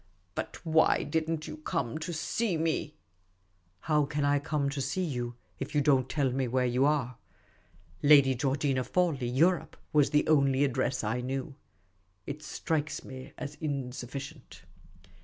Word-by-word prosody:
But - - -6
why 160 0 +4
did 160 -1 -1
n't 160 -2 -2
you - - -7
come 160 - -2
to 165 +2 -4
see 185 +3 -1
me? 155 -1 -1 0.3
" 95 0 -41
" 90 -1 -40
How 150 -1 +4
can 145 0 -1
I 145 0 +3
come 145 -1 -1
to 140 -1 -3
see 140 +8 -1
you 120 -7 -3 0.2
if 140 +3 -5
you 145 - +4
don't 135 -3 +3
tell 140 -4 +1
me 130 0 0
where 125 +1 +1
you 125 +2 +2
are? 135 -5 0 0.4
' 80 0 -30
Lady 140 -2 +7
Georgina 135 +1 0
Fawley, 160 -6 0
Europe,' 165 +8 +2 0.2
was 150 -2 +4
the 150 0 +2
only 140 -3 +4
address 130 -2 0
I 110 +4 -1
knew. 135 +2 -3 0.7
It 145 +2 -6
strikes 155 0 -2
me 130 -1 -9
as 145 -1 -5
insufficient." 135 0 -5
140 Hz, 165 wpm, -30 LUFS, 125-155 Hz, 0.7 s, Lady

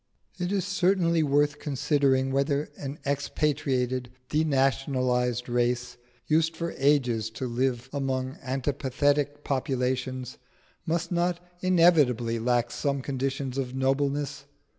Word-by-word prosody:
It 180 +1 -1
is 195 -3 0
certainly 180 -3 +2
worth 145 0 +2
considering 135 -2 +1
whether 140 +2 0
an 140 +1 -6
expatriated, 135 -3 0 0.2
denationalised 130 -4 +1
race, 125 0 0 0.3
used 160 +1 +2
for 170 0 -3
ages 125 -6 +2
to 115 +3 -5
live 125 0 -1
among 130 -2 -2
antipathetic 145 +2 0
populations, 130 -1 -2 0.5
must 170 +2 -1
not 175 0 +1 0.2
inevitably 150 -11 +4
lack 120 0 +1
some 140 -2 -1
conditions 135 0 -2
of 130 -1 -3
nobleness. 140 +1 0
135 Hz, 105 wpm, -27 LUFS, 125-150 Hz, 0.5 s, inevitably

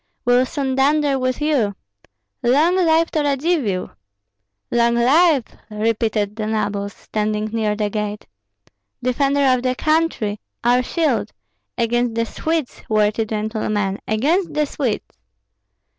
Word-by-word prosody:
We'll 245 +1 +4
soon 275 -3 -2
dunder 280 +1 +2
with 255 0 -1
you. 265 -10 +1 0.7
Long 295 +9 +3
life 330 -2 +3
to 315 - 0
Radzivill!" 280 - 0 0.8
"Long 235 0 +3
life!" 280 +4 +4 0.3
repeated 215 -1 -1
the 215 -1 -3
nobles, 205 -2 -2
standing 215 0 -2
near 215 -2 0
the 210 -1 -1
gate. 210 0 -3 0.8
"Defender 275 +3 +1
of 255 - 0
the 255 0 0
country! 305 -10 0 0.2
Our 245 +1 +4
shield! 250 - 0 0.5
Against 240 0 0
the 230 0 +1
Swedes, 315 +3 -3
worthy 215 +1 +2
gentlemen, 210 -2 -2
against 300 - +1
the 300 0 +2
Swedes!" 265 -6 -2
240 Hz, 120 wpm, -20 LUFS, 215-285 Hz, 0.8 s, We'll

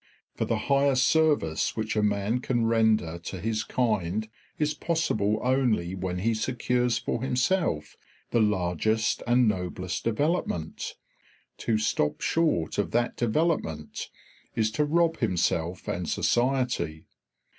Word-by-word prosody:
For - - -2
the 115 - 0
highest 140 -1 +3
service 145 - +2
which 110 0 -2
a 105 - +2
man 105 +3 +1
can 120 -2 0
render 110 -7 +2
to 90 +2 -6
his 110 +2 -1
kind 110 -3 0 0.3
is 150 0 +1
possible 110 -11 0
only 125 -9 +1
when 95 -1 -3
he 110 +5 +1
secures 125 +1 0
for - - -2
himself 125 - 0 0.4
the 120 - +3
largest 105 +1 +1
and 120 0 +4
noblest 90 -2 -2
development; 115 - -1 0.6
to 115 -2 +1
stop 105 -8 0
short 150 - +1
of 100 - 0
that 120 +1 +1
development 120 - -1 0.5
is 110 -1 +1
to 150 +6 +1
rob 165 +2 +2
himself 90 -4 0
and 90 -2 -2
society. 120 -10 0
110 Hz, 125 wpm, -27 LUFS, 90-130 Hz, 0.6 s, and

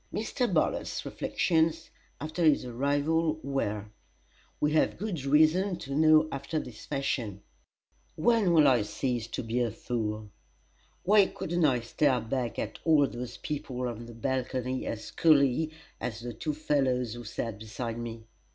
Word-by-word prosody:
Mr. 240 +2 -1
Bartlett's 160 -4 0
reflections, 165 -1 0 0.3
after 155 +4 -3
his 155 -5 +4
arrival, 145 +6 +1
were 110 -7 -2 0.7
we 150 - +2
have 155 - +2
good 185 -8 -3
reason 160 +7 +4
to 140 -5 -7
know 155 +1 +5
after 140 +4 -3
this 125 -7 -6
fashion: 120 -8 -2 0.7
"When 230 -6 +3
will 155 -3 +6
I 125 -4 +5
cease 120 +2 -2
to 120 - -4
be 115 +2 -1
a 120 -1 +1
fool? 110 -2 -4 0.7
Why 200 0 +5
couldn't 175 0 -1
I 125 -5 +3
stare 130 +3 +2
back 120 +1 -3
at - - -4
all 155 -3 +5
those 125 -2 -6
people 130 -4 -4
on 120 0 -6
the 120 - -10
balcony 130 +1 -2
as 110 - -5
coolly 155 -1 +4 0.3
as 115 -1 -4
the 120 0 -5
two 150 +7 -3
fellows 130 -6 +1
who 120 0 -8
sat 110 -1 -4
beside 115 +2 -5
me? 115 -1 -6
135 Hz, 150 wpm, -29 LUFS, 120-155 Hz, 0.7 s, will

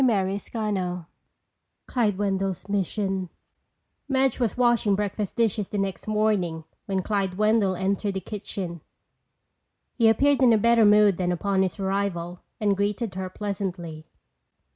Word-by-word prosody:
CHAPTER 195 -6 +2
V 200 -5 -3 0.8
Clyde 215 -6 0
Wendell's 195 -2 -1
Mission 195 -1 -1 0.8
Madge 265 -1 +2
was 235 -3 0
washing 240 -5 +3
breakfast 205 0 -3
dishes 220 -3 0
the 210 - -3
next 195 0 -3
morning 210 -7 0 0.2
when 190 -2 -1
Clyde 195 -3 -1
Wendell 215 -2 +2
entered 195 +2 -1
the - - 0
kitchen. 190 -4 -6 1.1
He 230 -3 +4
appeared 275 +5 +3
in 245 -3 +6
a - - +5
better 230 +1 +4
mood 210 -2 +5
than 180 -1 0
upon 190 +2 0
his 190 +1 -1
arrival 190 -3 -2 0.2
and 205 -2 +2
greeted 205 +2 -1
her 185 0 -4
pleasantly. 180 -6 -5
200 Hz, 135 wpm, -25 LUFS, 190-215 Hz, 1.1 s, in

